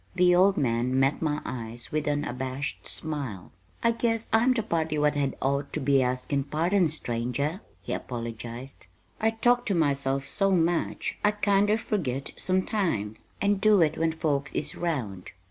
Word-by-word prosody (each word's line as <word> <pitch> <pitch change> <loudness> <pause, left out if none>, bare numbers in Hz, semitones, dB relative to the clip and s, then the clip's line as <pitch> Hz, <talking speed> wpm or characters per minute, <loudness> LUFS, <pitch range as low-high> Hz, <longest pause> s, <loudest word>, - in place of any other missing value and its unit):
The 180 -1 +5
old 190 +2 +5
man 125 0 +1
met 135 +2 +2
my 150 -2 -1
eyes 120 -1 -6
with 155 0 -1
an 145 0 +1
abashed 130 +2 -4
smile. 140 - -5 0.3
"I 230 - +5
guess 230 -1 -1
I'm 230 +3 +5
the 240 -3 +1
party 160 -6 -1
what 150 0 +3
had 145 -2 -1
ought 140 +1 0
to - - -1
be 135 -1 +3
askin' 130 +2 0
pardon, 170 +5 +2
stranger," 140 - -2 0.2
he - - -3
apologized. 120 +2 -6 0.3
"I 220 - +3
talk 245 +2 +2
to 200 - +1
myself 140 -3 +1
so 195 +5 +1
much 175 -2 0
I 210 - +5
kinder 205 0 +2
furgit 150 - -2
sometimes, 185 - -1
and 200 -1 +1
do 215 -1 +5
it 155 -1 +1
when 165 0 +1
folks 145 -3 -1
is - - -1
round. 120 - -3
150 Hz, 165 wpm, -27 LUFS, 130-195 Hz, 0.3 s, The